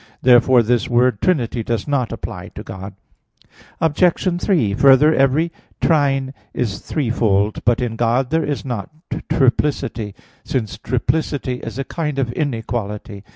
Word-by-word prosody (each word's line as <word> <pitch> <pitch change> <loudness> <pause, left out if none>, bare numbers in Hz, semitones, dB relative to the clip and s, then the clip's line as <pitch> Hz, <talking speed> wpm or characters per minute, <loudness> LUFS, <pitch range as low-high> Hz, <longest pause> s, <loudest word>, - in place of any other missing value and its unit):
Therefore 125 0 +6
this 120 +1 +1
word 120 -3 +2
"trinity" 125 -9 +1
does 115 -1 -2
not 140 -5 0
apply - - -6
to - - -7
God. 95 +1 -8 0.8
Obj. 175 +2 +1
3: 150 - +2
Further, 135 +6 +6
every 140 +5 +2 0.3
trine 135 -4 +2 0.2
is 110 -5 -2
threefold. 110 -7 0
But 120 +2 +3
in 115 -2 -3
God 120 +3 +1
there 160 0 +2
is 145 -2 -3
not 120 -2 -4 0.4
triplicity; 120 -6 0 0.3
since 110 -5 -3
triplicity 130 +2 -1
is 115 +1 -7
a 135 - -1
kind 150 0 -3
of 130 -4 0
inequality. 115 -7 -4
125 Hz, 135 wpm, -19 LUFS, 115-145 Hz, 0.8 s, Therefore